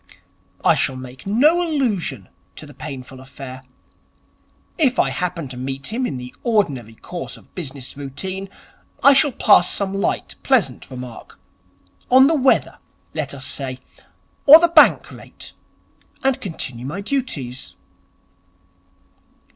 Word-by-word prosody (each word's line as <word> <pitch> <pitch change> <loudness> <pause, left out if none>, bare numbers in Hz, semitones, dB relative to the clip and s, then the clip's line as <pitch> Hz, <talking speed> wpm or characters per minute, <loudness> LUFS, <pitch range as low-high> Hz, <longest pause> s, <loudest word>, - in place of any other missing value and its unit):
'I - - +6
shall 130 - 0
make 130 +3 -10
no 295 - +4
allusion 215 - -1 0.3
to - - -9
the 145 - -13
painful 135 -3 -8
affair. 130 -1 -10 1.2
If 265 -5 +4
I - - +2
happen 170 -4 -3
to 125 - -8
meet 135 +8 -4
him 250 +2 -1
in 135 - -4
the 125 0 -8
ordinary 140 - 0
course 175 +9 -8
of - - -21
business 140 -6 -7
routine, 185 +8 -5 0.5
I 280 - +9
shall 280 +1 +4
pass 205 -6 +4
some 195 -1 -1
light, 195 - -2
pleasant - - +1
remark 125 -2 -10 0.7
on 260 +1 +7
the 310 - +3
weather, 270 -4 +2 0.3
let 145 -3 -4
us 130 -1 -8
say, 130 -2 -5 0.7
or 295 +3 +12
the 340 +1 +3
Bank 335 - +5
rate - - -11 0.7
and 270 -1 +1
continue 130 - -5
my 175 +8 -5
duties.' 180 - -3
160 Hz, 130 wpm, -20 LUFS, -, 1.2 s, or